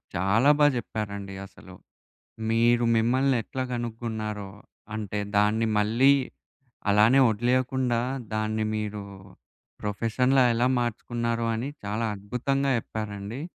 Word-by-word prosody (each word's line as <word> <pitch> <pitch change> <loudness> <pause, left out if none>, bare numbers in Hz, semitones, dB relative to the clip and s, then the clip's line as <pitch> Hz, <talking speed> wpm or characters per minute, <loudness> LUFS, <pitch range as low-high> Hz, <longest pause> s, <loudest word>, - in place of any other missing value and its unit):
చాలా 100 +10 +3
బాగా 145 -1 +6
చెప్పారండి 100 -4 -5
అసలు. 95 -1 -14 0.7
మీరు 120 +1 +3
మిమ్మల్ని 130 +4 +2
ఎట్లా 130 -1 -4
గనుక్కున్నారో, 110 -3 -4 0.5
అంటే 105 -1 -3 0.2
దాన్ని 105 +2 +3
మళ్ళీ 115 +6 +4 0.8
అలానే 110 +6 +5
వదిలేయకుండా, 125 +2 +1 0.3
దాన్ని 110 0 -1
మీరు 105 -1 -4 0.8
ప్రొఫెషన్‌లా 120 +6 +1
ఎలా 120 +2 +2
మార్చుకున్నారో 115 0 -2
అని 120 +5 -3 0.2
చాలా 110 +3 -1
అద్భుతంగా 130 +7 -1
జెప్పారండి. 110 +2 -6
115 Hz, 95 wpm, -26 LUFS, 105-125 Hz, 0.8 s, బాగా